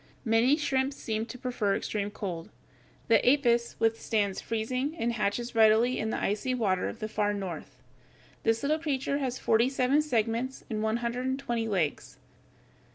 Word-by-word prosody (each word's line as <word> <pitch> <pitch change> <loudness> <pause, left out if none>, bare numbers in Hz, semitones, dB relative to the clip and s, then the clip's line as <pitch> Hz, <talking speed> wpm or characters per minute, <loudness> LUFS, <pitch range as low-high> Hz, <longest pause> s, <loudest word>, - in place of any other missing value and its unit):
Many 235 +5 +4
shrimps 270 -2 0
seem 220 0 -3
to 245 - -8
prefer 240 -6 -1
extreme 205 -1 -2
cold. 180 -5 -5 0.6
The 225 -2 +6
Apus - - -6 0.2
(Fig. - - -15
140), 235 0 +2
withstands 220 -3 0
freezing, 255 +7 -2
and 235 -5 0
hatches 235 +2 -1
readily 225 +2 +4
in 220 - -1
the - - -1
icy 215 +6 -1
water 195 -6 0
of - - -8
the 215 -2 -4
far 205 -1 0
north. 175 -9 -6 0.6
This 225 0 +1
little 305 +3 +1
creature 280 -2 -1
has 260 -2 -2
forty 230 +1 +3
seven 270 +2 +2
segments 240 -2 -1
and 215 -1 -1
one 220 +1 +1
hundred 245 +2 -2
and 260 0 0
twenty 240 -4 -2
legs. 180 -8 -2
230 Hz, 170 wpm, -29 LUFS, 215-255 Hz, 0.6 s, The